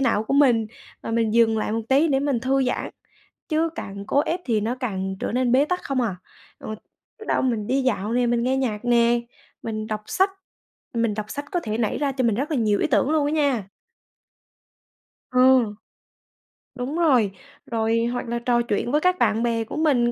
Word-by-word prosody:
não 220 Hz, -5 st, +1 dB
của 275 Hz, -, -1 dB
mình, 245 Hz, -6 st, +4 dB, 0.4 s
và -, -, -5 dB
mình 225 Hz, -1 st, +1 dB
dừng 225 Hz, -1 st, +4 dB
lại 215 Hz, -, -2 dB
một 225 Hz, -, 0 dB
tí 280 Hz, +5 st, +4 dB
để 270 Hz, -2 st, +2 dB
mình 275 Hz, -4 st, 0 dB
thư 265 Hz, +2 st, +1 dB
giãn, 250 Hz, -, -2 dB, 0.6 s
chứ 320 Hz, +1 st, +1 dB
càng 200 Hz, -7 st, -7 dB
cố 280 Hz, -, +2 dB
ép 335 Hz, +4 st, -2 dB
thì 225 Hz, -4 st, +1 dB
nó 230 Hz, +4 st, -1 dB
càng 190 Hz, -7 st, -3 dB
trở -, -, -2 dB
nên 250 Hz, 0 st, +1 dB
bế 265 Hz, +3 st, +5 dB
tắc 360 Hz, +4 st, -2 dB
không 270 Hz, -2 st, -1 dB
à. 215 Hz, -7 st, -1 dB, 0.4 s
Ừ, -, -, -9 dB, 0.5 s
biết 435 Hz, -, -10 dB
đâu -, -, +1 dB
mình 230 Hz, -5 st, 0 dB
đi 270 Hz, +1 st, +1 dB
dạo 225 Hz, -4 st, -1 dB
nè, 245 Hz, 0 st, +2 dB
mình 235 Hz, 0 st, +1 dB
nghe 260 Hz, +2 st, +1 dB
nhạc 235 Hz, -5 st, -2 dB
nè, 240 Hz, 0 st, +3 dB, 0.4 s
mình 215 Hz, -1 st, -4 dB
đọc 215 Hz, -1 st, -4 dB
sách 380 Hz, +2 st, +2 dB, 0.6 s
mình 230 Hz, -2 st, +1 dB
đọc 215 Hz, 0 st, -5 dB
sách 285 Hz, 0 st, -4 dB
có 355 Hz, -, +1 dB
thể 215 Hz, -4 st, -3 dB
nảy 225 Hz, -3 st, 0 dB
ra 285 Hz, -2 st, 0 dB
cho 260 Hz, -2 st, -1 dB
mình 225 Hz, -, +2 dB
rất 275 Hz, +8 st, -2 dB
là 300 Hz, -, 0 dB
nhiều 215 Hz, -3 st, +2 dB
ý -, -, +2 dB
tưởng 285 Hz, 0 st, +2 dB
luôn 310 Hz, -2 st, +2 dB
á 295 Hz, -, -1 dB
nha. 275 Hz, -10 st, +1 dB, 1.6 s
Ừ. 255 Hz, -4 st, +4 dB, 1.0 s
Đúng 255 Hz, +4 st, -4 dB
rồi. 255 Hz, -, +3 dB, 0.3 s
Rồi 230 Hz, 0 st, 0 dB
hoặc 245 Hz, 0 st, -3 dB
là 235 Hz, -, -1 dB
trò 240 Hz, 0 st, +1 dB
chuyện 235 Hz, +1 st, -1 dB
với 300 Hz, -, +2 dB
các 365 Hz, +1 st, +2 dB
bạn 225 Hz, +2 st, +2 dB
bè 230 Hz, -1 st, 0 dB
của 225 Hz, -, -8 dB
mình, 265 Hz, -7 st, +2 dB
240 Hz, 210 wpm, -23 LUFS, 225-275 Hz, 1.6 s, bế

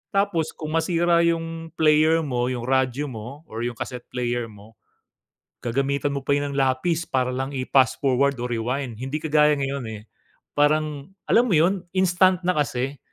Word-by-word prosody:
Tapos, 195 Hz, -5 st, 0 dB
kung 155 Hz, -1 st, -6 dB
masira 170 Hz, +1 st, +2 dB
yung 165 Hz, -1 st, -1 dB
player 155 Hz, +1 st, +4 dB
mo, 125 Hz, -4 st, -1 dB
yung 125 Hz, -2 st, -3 dB
radyo 130 Hz, +2 st, 0 dB
mo, 125 Hz, +7 st, -8 dB
or 110 Hz, -7 st, -8 dB
yung 120 Hz, 0 st, -3 dB
cassette 125 Hz, +1 st, -7 dB
player 120 Hz, -1 st, -2 dB
mo, 105 Hz, 0 st, -15 dB, 0.9 s
gagamitan 140 Hz, +4 st, 0 dB
mo 140 Hz, -, -2 dB
pa 140 Hz, +1 st, 0 dB
yun 145 Hz, 0 st, -1 dB
ng 140 Hz, -, -5 dB
lapis 145 Hz, +6 st, 0 dB
para 130 Hz, -1 st, 0 dB
lang 135 Hz, +2 st, -3 dB
i-pass-forward 135 Hz, +1 st, +2 dB
o 125 Hz, 0 st, -4 dB
rewind, 120 Hz, 0 st, -3 dB
hindi 135 Hz, +3 st, -4 dB
kagaya 150 Hz, -1 st, +4 dB
ngayon, 140 Hz, -2 st, -3 dB
eh. 105 Hz, -, -10 dB, 0.6 s
Parang 150 Hz, -1 st, +1 dB, 0.2 s
alam 240 Hz, +2 st, +4 dB
mo 190 Hz, -, +2 dB
yon 175 Hz, +3 st, +2 dB
instant 185 Hz, -1 st, +3 dB
na 180 Hz, -, +2 dB
kasi. 135 Hz, -2 st, -1 dB
140 Hz, 165 wpm, -24 LUFS, 125-160 Hz, 0.9 s, player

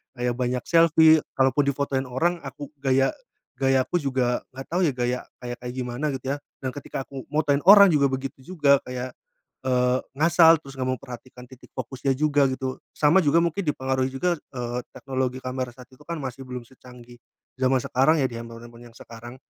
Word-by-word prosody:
Kayak 125 Hz, -1 st, -1 dB
banyak 125 Hz, 0 st, -1 dB
selfie, 160 Hz, -1 st, +5 dB, 0.2 s
kalaupun 135 Hz, +2 st, +2 dB
difotoin 135 Hz, -1 st, -1 dB
orang, 170 Hz, +8 st, 0 dB
aku 140 Hz, 0 st, -9 dB
gaya 135 Hz, 0 st, +2 dB, 0.5 s
gayaku 135 Hz, +5 st, +2 dB
juga 130 Hz, -4 st, -1 dB
nggak 135 Hz, -, -8 dB
tahu 180 Hz, +2 st, +1 dB
ya -, -, +1 dB
gaya 125 Hz, 0 st, -1 dB, 0.2 s
kayak 125 Hz, 0 st, -6 dB
gimana 125 Hz, +3 st, -3 dB
gitu 135 Hz, +2 st, -3 dB
ya, -, -, -7 dB, 0.3 s
dan 130 Hz, -, -2 dB
ketika 135 Hz, -1 st, -6 dB
aku 135 Hz, -1 st, -10 dB
motoin 145 Hz, -1 st, +1 dB
orang 200 Hz, -2 st, +9 dB
juga 140 Hz, -3 st, +3 dB
begitu 135 Hz, +1 st, -5 dB, 0.2 s
juga 140 Hz, -3 st, +5 dB
kayak, 125 Hz, 0 st, -5 dB, 0.6 s
eee, 125 Hz, 0 st, +2 dB, 0.2 s
ngasal 165 Hz, +2 st, +6 dB
terus 135 Hz, -1 st, -12 dB
nggak 130 Hz, -, -1 dB
memperhatikan 125 Hz, -1 st, -11 dB
titik 130 Hz, -, -15 dB
fokusnya 130 Hz, +1 st, -2 dB
juga, 145 Hz, -1 st, +3 dB
gitu. 130 Hz, 0 st, -4 dB, 0.2 s
Sama 150 Hz, +5 st, +4 dB
juga 165 Hz, +1 st, +3 dB
mungkin 170 Hz, +3 st, -1 dB
dipengaruhi 130 Hz, -2 st, 0 dB
juga, 170 Hz, +4 st, 0 dB
eee, 120 Hz, -3 st, -5 dB, 0.2 s
teknologi 130 Hz, -1 st, -3 dB
kamera 130 Hz, -1 st, -3 dB
saat 125 Hz, -1 st, -13 dB
itu 130 Hz, +3 st, -18 dB
kan 170 Hz, -, -3 dB
masih 130 Hz, +1 st, -6 dB
belum 125 Hz, -1 st, -6 dB
secanggih 125 Hz, -1 st, -16 dB, 0.4 s
zaman 130 Hz, 0 st, +3 dB
sekarang 135 Hz, +5 st, +3 dB
ya, -, -, +2 dB
di -, -, -7 dB
handphone-handphone 115 Hz, +1 st, -11 dB
yang 115 Hz, -, -25 dB
sekarang, 120 Hz, +2 st, -11 dB
130 Hz, 175 wpm, -24 LUFS, 125-145 Hz, 0.6 s, orang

